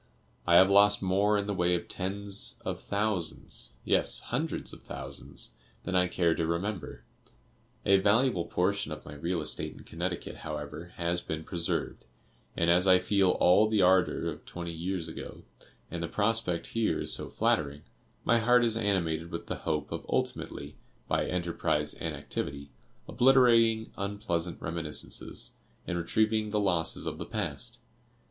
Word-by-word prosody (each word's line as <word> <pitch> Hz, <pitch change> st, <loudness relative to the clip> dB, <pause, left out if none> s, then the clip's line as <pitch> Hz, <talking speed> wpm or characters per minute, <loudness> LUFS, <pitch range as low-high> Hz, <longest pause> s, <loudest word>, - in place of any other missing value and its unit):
I 85 Hz, -, +5 dB
have 95 Hz, +2 st, +8 dB
lost 100 Hz, 0 st, +6 dB
more 100 Hz, +3 st, +2 dB
in 100 Hz, -, -1 dB
the 105 Hz, -, -2 dB
way 90 Hz, -1 st, +2 dB
of 85 Hz, -, -4 dB
tens 100 Hz, +2 st, 0 dB
of -, -, -3 dB
thousands, 100 Hz, -5 st, -1 dB
yes, -, -, +4 dB
hundreds 150 Hz, +7 st, -3 dB
of -, -, -11 dB
thousands, -, -, -7 dB, 0.3 s
than -, -, -4 dB
I 90 Hz, 0 st, +3 dB
care 85 Hz, -2 st, +1 dB
to 80 Hz, 0 st, -1 dB
remember. 90 Hz, +3 st, -3 dB, 0.8 s
A 100 Hz, 0 st, +6 dB
valuable 100 Hz, -1 st, +2 dB
portion 100 Hz, +3 st, 0 dB
of -, -, -7 dB
my 75 Hz, -, -9 dB
real 85 Hz, +3 st, -2 dB
estate 75 Hz, -, 0 dB
in -, -, -14 dB
Connecticut, 85 Hz, +1 st, -5 dB
however, 75 Hz, +1 st, -6 dB
has 85 Hz, 0 st, 0 dB
been 80 Hz, 0 st, -5 dB
preserved, 85 Hz, -5 st, -2 dB, 0.5 s
and 85 Hz, -, +1 dB
as 90 Hz, +2 st, +4 dB
I 95 Hz, -1 st, +7 dB
feel 95 Hz, 0 st, +2 dB
all 90 Hz, +4 st, +4 dB
the 105 Hz, -3 st, +3 dB
ardor 90 Hz, 0 st, +3 dB
of -, -, -10 dB
twenty 85 Hz, -1 st, -6 dB
years 85 Hz, +1 st, -3 dB
ago, 80 Hz, -, -9 dB, 0.5 s
and 85 Hz, 0 st, -4 dB
the 85 Hz, -, -2 dB
prospect 105 Hz, -2 st, 0 dB
here 115 Hz, -1 st, +1 dB
is -, -, 0 dB
so -, -, -4 dB
flattering, 70 Hz, -1 st, 0 dB, 0.4 s
my 115 Hz, -, +4 dB
heart 120 Hz, +1 st, +4 dB
is 115 Hz, -1 st, +5 dB
animated 85 Hz, -7 st, 0 dB
with 85 Hz, -2 st, -6 dB
the -, -, -4 dB
hope 75 Hz, -1 st, -1 dB
of -, -, -4 dB
ultimately, 70 Hz, +1 st, -3 dB, 0.3 s
by -, -, 0 dB
enterprise 85 Hz, -4 st, -1 dB
and -, -, -4 dB
activity, 70 Hz, 0 st, -5 dB, 0.4 s
obliterating 115 Hz, -3 st, +4 dB
unpleasant 100 Hz, -4 st, -2 dB
reminiscences, 80 Hz, -2 st, -1 dB, 0.3 s
and 90 Hz, -, -3 dB
retrieving 110 Hz, +5 st, +1 dB
the 105 Hz, 0 st, 0 dB
losses 90 Hz, -5 st, +1 dB
of -, -, -4 dB
the -, -, -4 dB
past. -, -, -3 dB
90 Hz, 155 wpm, -29 LUFS, 85-105 Hz, 0.8 s, have